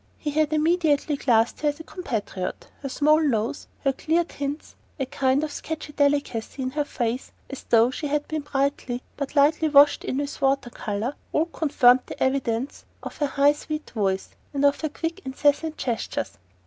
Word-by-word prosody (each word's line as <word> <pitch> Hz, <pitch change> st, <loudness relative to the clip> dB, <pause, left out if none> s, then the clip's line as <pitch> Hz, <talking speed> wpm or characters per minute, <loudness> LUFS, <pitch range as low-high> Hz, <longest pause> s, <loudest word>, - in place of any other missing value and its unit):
He 295 Hz, -, -3 dB
had 305 Hz, +1 st, +1 dB
immediately 310 Hz, -2 st, +2 dB
classed 235 Hz, -4 st, +2 dB
her 300 Hz, -, +3 dB
as 290 Hz, +1 st, -5 dB
a -, -, -7 dB
compatriot; 220 Hz, -, -4 dB, 0.2 s
her 275 Hz, -, -4 dB
small 300 Hz, +3 st, +4 dB
nose, 235 Hz, -5 st, -1 dB
her 275 Hz, -, +2 dB
clear 325 Hz, +5 st, +1 dB
tints, 285 Hz, -2 st, -6 dB, 0.2 s
a 270 Hz, -, 0 dB
kind 265 Hz, +2 st, +1 dB
of 310 Hz, -, -3 dB
sketchy 305 Hz, -1 st, -6 dB
delicacy 285 Hz, -4 st, 0 dB
in 255 Hz, -, -2 dB
her 295 Hz, +1 st, -1 dB
face, 240 Hz, -1 st, -3 dB, 0.2 s
as 275 Hz, -, -6 dB
though 230 Hz, +2 st, +5 dB
she 295 Hz, +3 st, -4 dB
had 295 Hz, +1 st, -1 dB
been 310 Hz, -1 st, -2 dB
brightly 275 Hz, -3 st, -1 dB
but 280 Hz, 0 st, -5 dB
lightly 305 Hz, +2 st, +4 dB
washed 290 Hz, 0 st, +6 dB
in 260 Hz, -, -2 dB
with 285 Hz, 0 st, -4 dB
water 270 Hz, -2 st, +1 dB
colour, 215 Hz, +7 st, -3 dB, 0.2 s
all 310 Hz, -, +2 dB
confirmed 265 Hz, -7 st, +4 dB
the -, -, -3 dB
evidence 260 Hz, -1 st, -1 dB, 0.2 s
of -, -, -7 dB
her 295 Hz, -, +1 dB
high 280 Hz, +1 st, +4 dB
sweet 305 Hz, +1 st, -6 dB
voice 195 Hz, -4 st, -1 dB, 0.3 s
and 280 Hz, 0 st, +2 dB
of 285 Hz, 0 st, +3 dB
her 315 Hz, -, -1 dB
quick 330 Hz, +4 st, -4 dB
incessant 290 Hz, +4 st, +1 dB
gestures. 235 Hz, -3 st, -3 dB
285 Hz, 180 wpm, -25 LUFS, 255-300 Hz, 0.3 s, washed